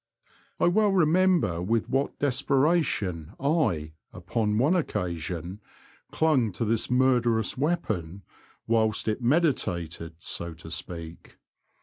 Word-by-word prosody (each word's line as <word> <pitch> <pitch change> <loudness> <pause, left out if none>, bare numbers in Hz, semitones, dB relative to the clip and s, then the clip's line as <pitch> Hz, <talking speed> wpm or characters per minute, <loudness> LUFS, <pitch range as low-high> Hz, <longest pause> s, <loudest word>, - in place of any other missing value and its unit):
I - - +3
well 205 +4 +3
remember 180 - +3
with 110 +5 0
what 135 +2 -1
desperation 130 - 0
I, 135 - 0 0.2
upon 105 -2 -1
one 145 +10 +3
occasion, 90 - -3 0.5
clung 140 -9 +2
to 115 - -2
this 110 0 0
murderous 125 -3 +2
weapon 110 - -2 0.4
whilst 110 -1 +1
it 110 +3 -1
meditated, 90 - 0
so 85 0 -4
to 80 0 -11
speak. 85 0 -8
115 Hz, 105 wpm, -27 LUFS, 85-145 Hz, 0.5 s, I